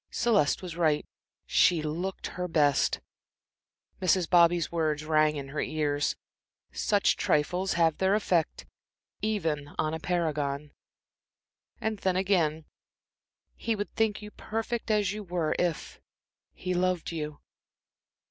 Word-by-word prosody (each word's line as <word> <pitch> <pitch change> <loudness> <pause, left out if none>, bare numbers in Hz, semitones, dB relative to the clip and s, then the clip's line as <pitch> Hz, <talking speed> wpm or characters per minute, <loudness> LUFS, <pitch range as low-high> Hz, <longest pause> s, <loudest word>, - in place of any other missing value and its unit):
Celeste 200 -9 +2
was 175 -2 -6
right 155 -3 +2 0.4
she 165 -3 +3
looked 175 +5 -3
her 180 0 -3
best. 145 -4 +2 1.0
Mrs. 185 -1 +3
Bobby's 170 -2 +4
words 155 -2 -1
rang 155 -1 +3
in 140 -2 -6
her 150 - -4
ears. 145 -2 0 0.6
"Such 205 -2 +2
trifles 180 +6 +1
have 165 -2 +2
their 190 +1 +3
effect 175 -6 0 0.6
even 165 -9 -1
on 155 0 0
a 160 - -3
paragon." 150 -5 -1 1.1
And 220 -2 -2
then 185 -2 +1
again 170 -5 +1 0.9
"He 230 - -1
would 205 0 -5
think 215 -2 0
you 210 - -8
perfect 225 +2 -4
as 205 -2 +2
you 210 - -5
were 175 -4 -1
if 175 -3 -2 0.5
he 185 0 -4
loved 180 -1 0
you." 150 -2 -4
170 Hz, 125 wpm, -28 LUFS, 155-190 Hz, 1.1 s, Bobby's